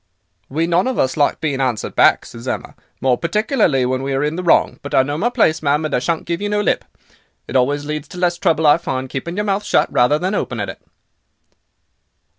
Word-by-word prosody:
"'We 160 Hz, +5 st, 0 dB
none 175 Hz, +5 st, +1 dB
of 260 Hz, -, -2 dB
us 130 Hz, 0 st, +1 dB
like 145 Hz, -2 st, +1 dB
being 140 Hz, -4 st, -1 dB
answered 125 Hz, -5 st, -2 dB
back,' -, -, +4 dB
says 115 Hz, +2 st, -10 dB
Emma, -, -, -4 dB, 0.3 s
'more 125 Hz, -2 st, +2 dB
particularly 175 Hz, -, +1 dB
when 130 Hz, +1 st, -1 dB
we 135 Hz, 0 st, -2 dB
are 135 Hz, +1 st, 0 dB
in 150 Hz, +2 st, -1 dB
the 180 Hz, -, -3 dB
wrong. 175 Hz, -, +2 dB
But 145 Hz, -, -4 dB
I 130 Hz, -, +5 dB
know 145 Hz, +2 st, -3 dB
my 205 Hz, +10 st, 0 dB
place 190 Hz, -10 st, +2 dB
ma'am, 150 Hz, +1 st, +1 dB
and 155 Hz, -, -3 dB
I -, -, +2 dB
shan't 165 Hz, +5 st, -2 dB
give 170 Hz, +2 st, -3 dB
you 205 Hz, -, -2 dB
no 210 Hz, 0 st, 0 dB
lip. 205 Hz, -, +1 dB, 0.6 s
It -, -, -7 dB
always 145 Hz, +3 st, +1 dB
leads 150 Hz, 0 st, -4 dB
to 180 Hz, -, -11 dB
less 175 Hz, -1 st, 0 dB
trouble, 160 Hz, -4 st, +1 dB
I 145 Hz, +1 st, +6 dB
find, 130 Hz, -5 st, -4 dB
keeping 170 Hz, +6 st, -4 dB
your 210 Hz, +1 st, -1 dB
mouth 200 Hz, 0 st, 0 dB
shut, -, -, +1 dB
rather 125 Hz, +5 st, +4 dB
than 185 Hz, +5 st, -2 dB
opening -, -, -2 dB
it. -, -, -9 dB
155 Hz, 230 wpm, -19 LUFS, 135-180 Hz, 0.6 s, I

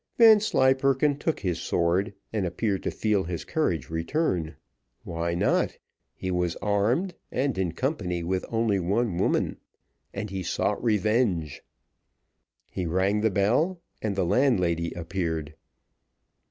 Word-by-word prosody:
Vanslyperken 140 Hz, -, +5 dB
took 160 Hz, +1 st, -1 dB
his 90 Hz, -4 st, -1 dB
sword, 90 Hz, +4 st, 0 dB, 0.2 s
and 105 Hz, -3 st, 0 dB
appeared 95 Hz, +3 st, -1 dB
to -, -, -2 dB
feel 105 Hz, -3 st, 0 dB
his 85 Hz, -1 st, -4 dB
courage 85 Hz, -, -1 dB
return 85 Hz, -, -1 dB, 0.5 s
why 85 Hz, 0 st, -2 dB
not? 90 Hz, -, +1 dB, 0.4 s
he 95 Hz, -, -4 dB
was 90 Hz, -1 st, 0 dB
armed, 105 Hz, -, 0 dB, 0.2 s
and 135 Hz, -2 st, 0 dB
in 95 Hz, -3 st, -1 dB
company 90 Hz, -, -2 dB
with 90 Hz, +2 st, -1 dB
only 110 Hz, -3 st, +1 dB
one 95 Hz, +1 st, 0 dB
woman, -, -, +1 dB, 0.5 s
and 100 Hz, 0 st, -5 dB
he 95 Hz, -1 st, -3 dB
sought 90 Hz, +3 st, -1 dB
revenge. 105 Hz, -, +1 dB, 1.1 s
He 90 Hz, -, -3 dB
rang 95 Hz, +5 st, +1 dB
the 110 Hz, -, +3 dB
bell, 120 Hz, -, +1 dB, 0.2 s
and 105 Hz, -2 st, -1 dB
the 95 Hz, -, +1 dB
landlady 90 Hz, -, +2 dB
appeared. 80 Hz, -3 st, -3 dB
95 Hz, 125 wpm, -26 LUFS, 85-120 Hz, 1.1 s, Vanslyperken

